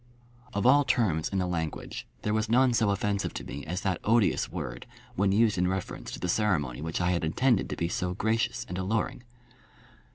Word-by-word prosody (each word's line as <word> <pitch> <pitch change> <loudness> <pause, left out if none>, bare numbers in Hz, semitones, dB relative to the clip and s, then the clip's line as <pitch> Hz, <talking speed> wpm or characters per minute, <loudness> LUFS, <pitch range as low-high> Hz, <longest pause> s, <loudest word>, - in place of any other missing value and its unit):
Of 100 - 0
all 145 +3 +6
terms 110 - +1
in 100 - -2
the 90 - +1
language 80 -3 -4 0.2
there 105 - 0
was 110 0 0
none 125 +2 +4
so 115 -3 +2
offensive 100 0 -1
to - - -4
me 70 - -7
as 90 +4 -3
that 95 -3 -1
odious 115 -1 +2
word - - -6 0.3
when 100 +1 +2
used 105 -2 +3
in 90 - +2
reference 95 0 -4
to - - -6
the 90 - -2
ceremony 85 - 0
which 80 +1 -3
I 90 0 +2
had 85 -2 0
intended 115 +8 +2
to - - -3
be 85 - -1
so 90 +1 -2
gracious 110 +3 0
and 90 +1 -4
alluring. 110 +6 -1
95 Hz, 200 wpm, -28 LUFS, 90-110 Hz, 0.3 s, all